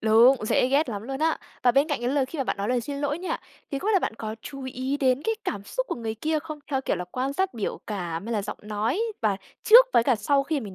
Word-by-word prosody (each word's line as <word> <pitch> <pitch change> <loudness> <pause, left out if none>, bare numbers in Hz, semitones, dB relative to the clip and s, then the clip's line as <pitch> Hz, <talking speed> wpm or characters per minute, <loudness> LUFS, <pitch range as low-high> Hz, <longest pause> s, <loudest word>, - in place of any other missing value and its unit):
Đúng, 225 +5 +6
dễ 250 - +3
ghét 280 +1 +2
lắm 205 -2 -4
luôn 270 +3 -5
á. 320 0 +2 0.2
Và 245 - +5
bên 280 +5 +3
cạnh 290 -5 -1
cái 240 - -1
lời 275 -2 +1
khi 305 +3 -8
mà 270 - 0
bạn - - -1
nói 200 +2 -2
lời 250 -1 +2
xin 280 +4 -5
lỗi 290 +2 -1
nha, 370 - -2 0.3
thì 275 - -2
không 405 - -3
biết - - +3
là 390 - +5
bạn 220 - -2
có 220 -1 -5
chú 275 -2 -8
ý 260 +2 -2
đến 265 -1 +2
cái 450 - +1
cảm 200 -1 -3
xúc - - -3
của - - -1
người 225 -2 -4
kia 310 +7 0
không, 310 0 -7
theo 265 -1 +1
kiểu 230 - -1
là 180 - -4
quan 265 +2 -1
sát 375 -3 -1
biểu 215 - -3
cảm 175 -2 -4
hay 235 - -3
là 210 -2 0
giọng 205 - -6
nói 215 - -1 0.2
và 210 -3 +1 0.3
trước 485 +3 +9
với - - +5
cả 255 - +3
sau 275 +7 +2
khi 290 0 -1
mà - - -7
mình 195 -3 -8
260 Hz, 300 wpm, -26 LUFS, 220-290 Hz, 0.3 s, trước